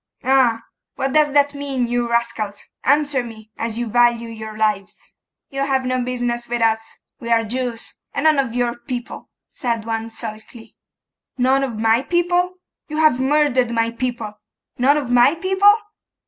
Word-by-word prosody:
'Ah! 250 Hz, -4 st, +3 dB, 0.3 s
What 270 Hz, 0 st, -2 dB
does 305 Hz, -1 st, +4 dB
that 285 Hz, 0 st, +3 dB
mean, 280 Hz, -3 st, -2 dB
you 240 Hz, 0 st, -1 dB
rascals? 230 Hz, -3 st, -2 dB, 0.2 s
Answer 285 Hz, -1 st, +2 dB
me, 220 Hz, -2 st, -11 dB
as 230 Hz, -1 st, -3 dB
you 240 Hz, -, -1 dB
value 235 Hz, 0 st, +2 dB
your 220 Hz, -1 st, -8 dB
lives.' 210 Hz, -2 st, -2 dB, 0.4 s
'You 275 Hz, 0 st, -1 dB
have 265 Hz, -1 st, 0 dB
no 255 Hz, 0 st, 0 dB
business 245 Hz, -1 st, -2 dB
with 240 Hz, 0 st, -2 dB
us: 220 Hz, -1 st, +3 dB, 0.4 s
we 235 Hz, 0 st, -5 dB
are 230 Hz, -1 st, +4 dB
Jews, 240 Hz, 0 st, -4 dB
and 280 Hz, -, -3 dB
none 310 Hz, -2 st, +4 dB
of 255 Hz, -4 st, -1 dB
your 240 Hz, -1 st, 0 dB
people,' 245 Hz, -1 st, -6 dB, 0.2 s
said 235 Hz, -3 st, -2 dB
one 225 Hz, 0 st, -3 dB
sulkily. 225 Hz, 0 st, -9 dB, 0.6 s
'None 265 Hz, +2 st, +3 dB
of 235 Hz, -5 st, -3 dB
my 225 Hz, +2 st, +3 dB
people? 350 Hz, +4 st, +1 dB, 0.3 s
You 305 Hz, -, -5 dB
have 310 Hz, -5 st, +4 dB
murdered 265 Hz, -3 st, +2 dB
my 230 Hz, -1 st, 0 dB
people! 230 Hz, -4 st, -4 dB, 0.4 s
None 280 Hz, +4 st, +4 dB
of 270 Hz, -5 st, -3 dB
my 245 Hz, +5 st, +5 dB
people? 385 Hz, +4 st, +4 dB
245 Hz, 160 wpm, -20 LUFS, 230-275 Hz, 0.6 s, my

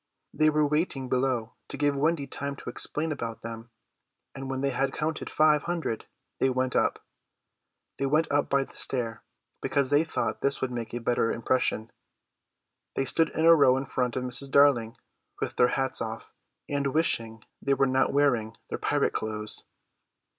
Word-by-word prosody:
They 155 Hz, +1 st, +4 dB
were 150 Hz, 0 st, +2 dB
waiting 145 Hz, -3 st, -1 dB
below 125 Hz, -3 st, 0 dB
to -, -, -6 dB
give 145 Hz, 0 st, +1 dB
Wendy 150 Hz, +1 st, +1 dB
time 140 Hz, 0 st, -5 dB
to -, -, -7 dB
explain 160 Hz, +1 st, -1 dB
about 115 Hz, -6 st, -5 dB
them; 115 Hz, 0 st, -7 dB, 0.6 s
and 135 Hz, -1 st, -7 dB
when 130 Hz, 0 st, -2 dB
they 140 Hz, 0 st, +1 dB
had 135 Hz, +2 st, 0 dB
counted 155 Hz, +1 st, -3 dB
five 150 Hz, -1 st, +4 dB
hundred 165 Hz, -10 st, -3 dB, 0.3 s
they 130 Hz, -, +3 dB
went 130 Hz, 0 st, -1 dB
up. -, -, +1 dB, 0.9 s
They 135 Hz, -, +1 dB
went 155 Hz, +3 st, +2 dB
up 145 Hz, 0 st, +1 dB
by 140 Hz, 0 st, +3 dB
the -, -, -15 dB
stair, 115 Hz, -4 st, 0 dB, 0.4 s
because 140 Hz, -1 st, +1 dB
they 145 Hz, +2 st, +5 dB
thought 165 Hz, -, -2 dB
this 140 Hz, 0 st, +1 dB
would 130 Hz, -, -2 dB
make 115 Hz, -2 st, -5 dB
a -, -, -2 dB
better 115 Hz, -1 st, +1 dB
impression. 115 Hz, -2 st, 0 dB, 1.0 s
They 135 Hz, -, 0 dB
stood 165 Hz, +4 st, +3 dB
in 160 Hz, -, +1 dB
a 165 Hz, -, +9 dB
row 135 Hz, -5 st, +5 dB
in 135 Hz, -, -3 dB
front 125 Hz, -2 st, -1 dB
of 130 Hz, -, -1 dB
Mrs. 125 Hz, +2 st, 0 dB
Darling, 135 Hz, -5 st, +4 dB, 0.4 s
with -, -, -3 dB
their 125 Hz, -, +6 dB
hats 135 Hz, -1 st, 0 dB
off, 115 Hz, 0 st, -6 dB, 0.3 s
and 140 Hz, -1 st, -1 dB
wishing 115 Hz, -8 st, 0 dB, 0.2 s
they 140 Hz, 0 st, +2 dB
were 135 Hz, +1 st, +3 dB
not 130 Hz, 0 st, +2 dB
wearing 125 Hz, -6 st, +1 dB
their -, -, -4 dB
pirate -, -, +1 dB
clothes. 110 Hz, -1 st, -3 dB
135 Hz, 175 wpm, -27 LUFS, 120-145 Hz, 1.0 s, a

